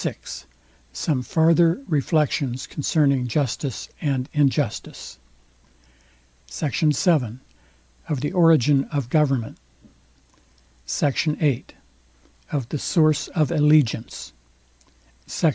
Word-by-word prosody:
VI -, -, -2 dB, 0.8 s
SOME 135 Hz, -, -1 dB
FARTHER 165 Hz, -, +3 dB
REFLECTIONS 145 Hz, -5 st, 0 dB
CONCERNING 140 Hz, -3 st, 0 dB
JUSTICE 130 Hz, -3 st, -2 dB
AND 135 Hz, -3 st, -1 dB
INJUSTICE 145 Hz, -, -1 dB, 1.3 s
SECT. 150 Hz, -5 st, -4 dB
VII 150 Hz, -, +1 dB, 0.7 s
OF 145 Hz, -5 st, -2 dB
THE 145 Hz, -, -2 dB
ORIGIN 150 Hz, -6 st, +4 dB
OF 140 Hz, -6 st, -4 dB
GOVERNMENT 135 Hz, -7 st, +1 dB, 1.3 s
SECT. 145 Hz, 0 st, 0 dB
VIII 140 Hz, -6 st, 0 dB, 0.9 s
OF 135 Hz, -5 st, -2 dB
THE 150 Hz, -, -3 dB
SOURCE 155 Hz, -1 st, +2 dB
OF 155 Hz, -2 st, 0 dB
ALLEGIANCE 150 Hz, -7 st, +1 dB, 0.9 s
SECT. 165 Hz, -, +1 dB
145 Hz, 90 wpm, -22 LUFS, 130-155 Hz, 1.3 s, ORIGIN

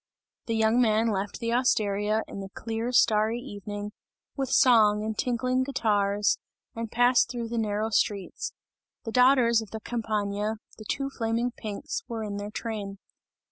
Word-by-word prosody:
The 230 Hz, -, 0 dB
young 220 Hz, +2 st, +3 dB
man 225 Hz, 0 st, +3 dB
left 200 Hz, 0 st, -3 dB
the 230 Hz, -1 st, -1 dB
osteria, 215 Hz, -3 st, +1 dB
in -, -, -7 dB
the 195 Hz, 0 st, -6 dB
clear 225 Hz, +4 st, -4 dB
starry 220 Hz, -1 st, +3 dB
evening, 205 Hz, -1 st, -6 dB, 0.4 s
with 270 Hz, -3 st, -2 dB
song 215 Hz, -6 st, +5 dB
and 220 Hz, 0 st, -2 dB
tinkling 255 Hz, +2 st, 0 dB
guitars, 210 Hz, -6 st, +1 dB, 0.4 s
and 230 Hz, -1 st, -5 dB
passed 245 Hz, +1 st, +4 dB
through 240 Hz, -2 st, -4 dB
the 235 Hz, 0 st, -1 dB
narrow 215 Hz, 0 st, -1 dB
streets. 200 Hz, -2 st, -1 dB, 0.5 s
The 225 Hz, -, -3 dB
daughters 250 Hz, -2 st, +5 dB
of 220 Hz, -, -9 dB
the 220 Hz, -, -6 dB
Campagna, 215 Hz, -2 st, -2 dB, 0.2 s
the 215 Hz, -, -10 dB
two 275 Hz, +5 st, -2 dB
flaming 230 Hz, 0 st, -1 dB
pinks, 245 Hz, -, -5 dB
were 230 Hz, -2 st, -4 dB
in 205 Hz, -1 st, -4 dB
their 205 Hz, 0 st, -5 dB
train. 210 Hz, -3 st, -5 dB
220 Hz, 155 wpm, -27 LUFS, 210-240 Hz, 0.5 s, song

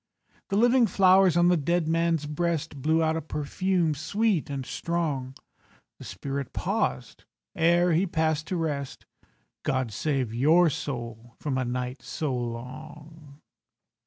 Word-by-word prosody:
The 195 Hz, -, -1 dB
living 240 Hz, +2 st, +4 dB
flowers 185 Hz, -2 st, +5 dB
on 175 Hz, 0 st, +5 dB
the 180 Hz, -, +4 dB
dead 170 Hz, +2 st, 0 dB
man's 165 Hz, -1 st, +1 dB
breast 155 Hz, -2 st, -2 dB
Blew 160 Hz, +3 st, +2 dB
out 160 Hz, 0 st, +1 dB
a 165 Hz, -, -2 dB
perfume 165 Hz, +3 st, -1 dB
sweet 180 Hz, +4 st, 0 dB
and 135 Hz, -2 st, -4 dB
strong. 145 Hz, -4 st, -3 dB, 0.6 s
The -, -, -10 dB
spirit 135 Hz, +8 st, -5 dB
paused -, -, -2 dB, 0.3 s
ere 170 Hz, +1 st, +3 dB
he 180 Hz, +5 st, +2 dB
passed 160 Hz, -2 st, 0 dB
to 185 Hz, -, -2 dB
rest— 145 Hz, -5 st, -3 dB, 0.6 s
"God 130 Hz, -3 st, -1 dB
save 135 Hz, -3 st, -1 dB
your 160 Hz, +7 st, +4 dB
soul 120 Hz, -4 st, -6 dB
from 145 Hz, -3 st, -2 dB
a 130 Hz, -, -1 dB
night 125 Hz, +1 st, -4 dB
so 145 Hz, -1 st, -3 dB
long." 145 Hz, +5 st, -8 dB
155 Hz, 135 wpm, -27 LUFS, 135-170 Hz, 0.6 s, flowers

